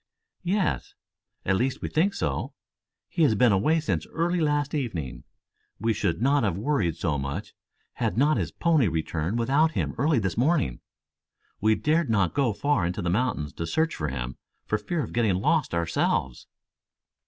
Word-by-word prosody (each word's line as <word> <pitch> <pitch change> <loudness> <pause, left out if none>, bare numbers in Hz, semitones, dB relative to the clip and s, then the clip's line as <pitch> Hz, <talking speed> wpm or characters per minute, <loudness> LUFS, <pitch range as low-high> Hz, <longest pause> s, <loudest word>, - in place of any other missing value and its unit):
"Yes. 190 +2 -1 0.5
At 95 0 +2
least 130 +4 -1
we - - -1
think 185 +6 +1
so. - - -2 0.5
He 170 - -3
has 140 -8 +5
been 120 +2 +4
away 150 +12 +3
since 155 - -2
early 175 +2 0
last 145 -2 +1
evening. 110 - -3 0.5
We 115 0 +1
should 85 -5 -1
not 140 +2 +4
have 100 -6 0
worried 105 - 0
so 80 -4 -1
much 70 +9 -4 0.4
had - - -2
not 150 +4 +4
his - - -2
pony 160 -8 +2
returned 80 +4 -2
without 140 +7 +2
him - - -1
early 150 0 +3
this 95 -5 -1
morning. 140 - +1 0.8
We 110 +1 +3
dared 155 +3 +1
not 100 -6 +2
go 135 -4 +2
far 130 0 +1
into 90 +3 -2
the 85 - 0
mountains 95 - -1
to 85 - -4
search 160 - +1
for 75 - -2
him 65 -2 -4 0.3
for 105 - 0
fear 155 +8 -2
of - - -7
getting 110 -5 +2
lost 140 - +1
ourselves." 85 -6 0
115 Hz, 170 wpm, -26 LUFS, -, 0.8 s, has